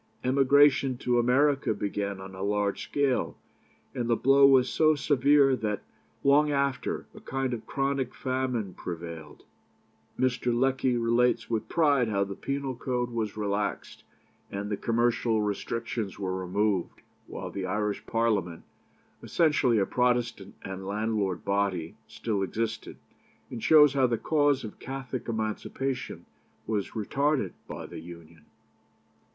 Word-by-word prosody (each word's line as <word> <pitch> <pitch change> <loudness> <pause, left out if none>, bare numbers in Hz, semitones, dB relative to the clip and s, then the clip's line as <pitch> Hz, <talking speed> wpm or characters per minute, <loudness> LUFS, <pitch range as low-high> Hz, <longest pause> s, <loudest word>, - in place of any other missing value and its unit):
Emigration 135 0 +4
to 120 0 +1
America 135 0 +2
began 100 -1 -3
on 95 0 -9
a 95 - -8
large 100 0 0
scale, 140 -3 0 0.6
and 120 -1 -3
the 115 - +4
blow 135 +3 +6
was 130 -2 +5
so 155 +2 +3
severe 140 -1 +4
that 105 -4 -3 0.4
long 145 +2 +5
after, 140 -2 -1
a - - -11
kind 135 -1 -2
of 115 -2 -6
chronic 135 -2 -1
famine 130 -6 -2
prevailed." 85 -2 -8 0.7
Mr. 125 -1 +1
Lecky 130 0 +1
relates 120 0 +1
with 110 -1 -2
pride 145 -7 +3
how 100 -2 +1
the 100 0 -5
penal 140 +4 -3
code 125 0 -2
was 110 -3 -3
relaxed, 100 -1 -3 0.5
and 100 +1 -4
the - - +1
commercial 115 -1 +1
restrictions 110 0 -3
were 95 -2 -2
removed, 95 +1 -1 0.2
while - - -6
the 95 -2 -4
Irish 105 +1 -2
Parliament, 105 -7 0 0.6
essentially 145 -8 +2
a 100 - +3
Protestant 120 -4 0
and 95 0 -6
landlord 105 -3 -1
body, 100 -4 0
still 105 -4 -3
existed, 110 +4 -3 0.5
and 115 - -6
shows 150 -1 +6
how 135 -2 +3
the 120 -1 0
cause 145 +2 +2
of 110 - -8
Catholic 130 -2 -6
Emancipation 115 +4 -3 0.4
was 105 -2 -3
retarded 140 +7 0 0.2
by - - -7
the - - -8
Union. 85 -2 -13
115 Hz, 135 wpm, -28 LUFS, 100-135 Hz, 0.7 s, blow